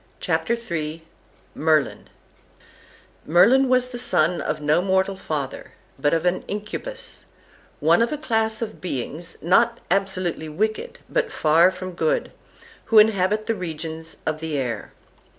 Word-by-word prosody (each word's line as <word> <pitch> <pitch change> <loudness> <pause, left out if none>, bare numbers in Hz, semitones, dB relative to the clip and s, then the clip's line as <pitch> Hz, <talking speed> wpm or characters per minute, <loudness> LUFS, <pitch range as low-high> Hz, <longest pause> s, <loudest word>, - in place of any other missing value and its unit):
CHAPTER 235 - 0
III 165 -8 -4 0.5
MERLIN 155 -2 +1 1.2
Merlin 250 - +5
was 255 0 +3
the 245 -1 -5
son 170 -7 +2
of - - -2
no 150 +3 +2
mortal 190 +1 +1
father, 150 -7 -5 0.3
but 145 +2 +2
of 165 +1 +1
an 180 +1 +1
Incubus, 210 - -5 0.5
one - - +4
of 235 - +2
a 300 - -2
class 225 -6 0
of 220 -1 -7
beings 160 +1 -5
not 230 +7 +3
absolutely 185 -4 -1
wicked, 215 - -2
but - - 0
far 165 +3 +4
from 185 0 -6
good, - - 0 0.5
who 225 - +3
inhabit 210 0 +4
the 225 - +1
regions 160 -3 -5
of 155 -1 -1
the 160 -2 -3
air. 120 -6 -3
185 Hz, 135 wpm, -23 LUFS, 160-220 Hz, 1.2 s, Merlin